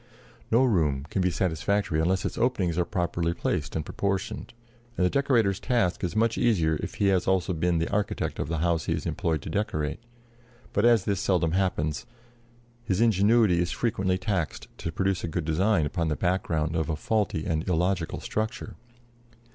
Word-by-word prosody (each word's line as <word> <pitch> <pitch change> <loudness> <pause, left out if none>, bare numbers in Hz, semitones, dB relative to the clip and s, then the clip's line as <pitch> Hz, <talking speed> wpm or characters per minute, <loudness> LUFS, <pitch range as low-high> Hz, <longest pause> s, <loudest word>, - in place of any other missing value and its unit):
No 115 +3 +4
room 75 - +1
can 95 - 0
be 90 - +2
satisfactory 90 0 0
unless 95 +3 +1
its - - -2
openings 110 -9 +1
are 85 - +2
properly 85 -1 -1
placed - - -2
and 80 -2 -2
proportioned, 100 +5 -3 0.5
and 90 - +3
the 90 - +2
decorator's 115 -8 +2
task 115 -9 0
is 90 +3 -2
much 115 +1 +2
easier 80 -10 +2
if - - -5
he 100 - +2
has 95 -2 +1
also 95 -1 +1
been 85 +1 +1
the 80 - 0
architect 105 0 -1
of - - -2
the 85 +1 -2
house 85 -3 +1
he - - 0
is - - -4
employed 80 -4 -1
to - - -6
decorate; 75 -6 -2 0.7
but 100 - +2
as 115 -5 +5
this 100 -2 0
seldom 90 -6 +1
happens 90 -1 -1 0.8
his 95 -5 -1
ingenuity 110 -3 +4
is 85 0 0
frequently 95 -5 0
taxed 95 -6 -2
to 85 - -3
produce 95 +2 -1
a - - -1
good 80 0 -3
design 85 +2 +2
upon 85 +2 -1
the 75 - 0
background 85 -3 0
of 80 0 -1
a 80 - 0
faulty 95 -2 -1
and 80 +2 -1
illogical 90 0 0
structure. 110 +2 -3
90 Hz, 180 wpm, -27 LUFS, 80-105 Hz, 0.8 s, as